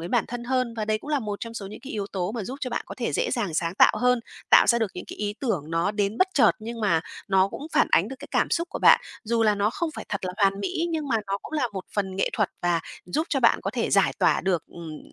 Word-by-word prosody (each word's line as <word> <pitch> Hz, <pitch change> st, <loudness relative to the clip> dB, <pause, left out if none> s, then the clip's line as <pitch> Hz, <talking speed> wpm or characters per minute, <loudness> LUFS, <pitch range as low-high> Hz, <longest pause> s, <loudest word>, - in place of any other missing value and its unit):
đến 170 Hz, +2 st, -6 dB
bản -, -, +2 dB
thân 240 Hz, 0 st, -5 dB
hơn. 255 Hz, -2 st, 0 dB
Và 215 Hz, -, -1 dB
đấy 215 Hz, 0 st, 0 dB
cũng 295 Hz, -, -9 dB
là 295 Hz, -, +2 dB
một 210 Hz, -4 st, -4 dB
trong 230 Hz, 0 st, -6 dB
số 205 Hz, -4 st, -5 dB
những 200 Hz, -, -9 dB
cái 275 Hz, -, -8 dB
yếu 205 Hz, -2 st, -3 dB
tố 190 Hz, +1 st, -2 dB
mà 225 Hz, -5 st, -4 dB
giúp 260 Hz, +6 st, -6 dB
cho 255 Hz, -, -3 dB
bạn 235 Hz, -, -2 dB
có -, -, -7 dB
thể 235 Hz, -, -1 dB
dễ -, -, 0 dB
dàng 180 Hz, -6 st, -1 dB
sáng 170 Hz, +2 st, -1 dB
tạo -, -, +6 dB
hơn, 250 Hz, -1 st, +3 dB, 0.3 s
tạo -, -, +8 dB
ra 235 Hz, -, +4 dB
được 225 Hz, -4 st, 0 dB
những 180 Hz, -, -6 dB
cái -, -, -8 dB
ý 205 Hz, 0 st, -2 dB
tưởng 180 Hz, -, -2 dB
nó 165 Hz, +4 st, +1 dB
đến 205 Hz, +1 st, -1 dB
bất 375 Hz, -, +4 dB
chợt, 275 Hz, -, +6 dB
nhưng 230 Hz, +1 st, -6 dB
mà 185 Hz, -7 st, +2 dB, 0.3 s
nó 190 Hz, 0 st, +4 dB
cũng 290 Hz, -, -7 dB
phản -, -, +4 dB
ánh 190 Hz, +6 st, +4 dB
được 270 Hz, -, -7 dB
cái -, -, -10 dB
cảm -, -, +1 dB
xúc 335 Hz, 0 st, 0 dB
của -, -, -4 dB
bạn. -, -, +7 dB, 0.2 s
Dù 230 Hz, +1 st, +1 dB
là 215 Hz, -2 st, +4 dB
nó 205 Hz, +1 st, +1 dB
không 330 Hz, +5 st, -2 dB
phải -, -, -6 dB
thật 200 Hz, -2 st, -3 dB
là 180 Hz, -, -3 dB
hoàn 195 Hz, -1 st, +2 dB
mỹ, 325 Hz, -, -1 dB
nhưng 310 Hz, -3 st, -2 dB
mà 230 Hz, -, +2 dB
nó 195 Hz, 0 st, -1 dB
cũng -, -, -10 dB
là 290 Hz, -6 st, 0 dB
một 190 Hz, -2 st, -5 dB
phần 190 Hz, -2 st, -2 dB
nghệ 195 Hz, -, +1 dB
thuật 210 Hz, -5 st, +1 dB
và 175 Hz, -1 st, +2 dB, 0.3 s
giúp 310 Hz, -, -1 dB
cho 275 Hz, -, +1 dB
bạn 235 Hz, -, +4 dB
có 195 Hz, -, -2 dB
thể 235 Hz, -1 st, -2 dB
giải 195 Hz, -1 st, +4 dB
tỏa -, -, +3 dB
được, 180 Hz, -4 st, 0 dB
ừm, 160 Hz, -3 st, -9 dB
210 Hz, 305 wpm, -25 LUFS, 190-245 Hz, 0.3 s, tạo